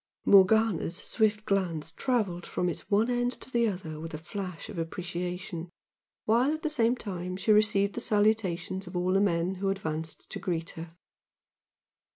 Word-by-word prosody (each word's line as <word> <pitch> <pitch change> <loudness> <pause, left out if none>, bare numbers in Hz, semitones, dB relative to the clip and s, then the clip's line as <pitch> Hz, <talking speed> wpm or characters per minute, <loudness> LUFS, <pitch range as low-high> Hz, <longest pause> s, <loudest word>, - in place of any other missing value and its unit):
Morgana's 200 -3 +5
swift 215 0 0
glance 180 -6 -1
travelled 205 -10 -1
from 180 - -1
its 170 - -6
one 210 +3 +3
end 245 0 +1
to 260 - -6
the 235 -1 +3
other 170 -6 -4
with 165 0 -6
a - - -3
flash 180 +2 -6
of 200 -5 -6
appreciation, 175 0 -4 0.6
while 240 +6 +3
at 315 - -10
the 310 - +1
same 240 -5 +2
time 185 -5 -5
she 215 - +1
received 210 -1 +4
the - - -4
salutations 195 -4 +1
of 180 - -9
all 180 +1 +1
the 195 - +4
men 175 -2 +1
who 195 - +1
advanced 160 -4 -4
to - - -4
greet 170 -4 -2
her. 165 0 -9
190 Hz, 170 wpm, -29 LUFS, 175-215 Hz, 0.6 s, Morgana's